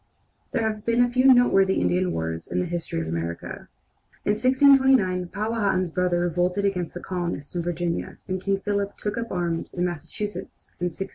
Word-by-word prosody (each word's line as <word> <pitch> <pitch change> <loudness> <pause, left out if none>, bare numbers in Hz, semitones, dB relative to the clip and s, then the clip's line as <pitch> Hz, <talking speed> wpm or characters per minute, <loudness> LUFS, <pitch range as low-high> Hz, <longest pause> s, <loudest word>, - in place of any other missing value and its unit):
There 230 -3 +1
have 215 -1 -4
been 235 +1 +3
but 245 - -5
few 260 +1 +6
noteworthy 195 -6 +5
Indian 90 0 +1
wars 80 0 -3
in 90 - -1
the - - 0
history 170 - -3
of 80 - -4
America. 85 +1 -5 0.6
In - - +3
1629 260 -6 +4
Powhatan's 200 -3 -1
brother 180 0 +1
revolted 180 +3 0
against 180 -4 -1
the 175 - -5
colonists 175 -4 -4
in 175 - 0
Virginia, 170 0 -3
and 185 0 -2
King 195 0 0
Philip 200 -1 -2
took 210 - -3
up 230 - -5
arms 170 -2 -2
in 175 0 0
Massachusetts 175 +5 -6
in 175 - -1
1675. 180 +2 -4
180 Hz, 180 wpm, -25 LUFS, 170-210 Hz, 0.6 s, few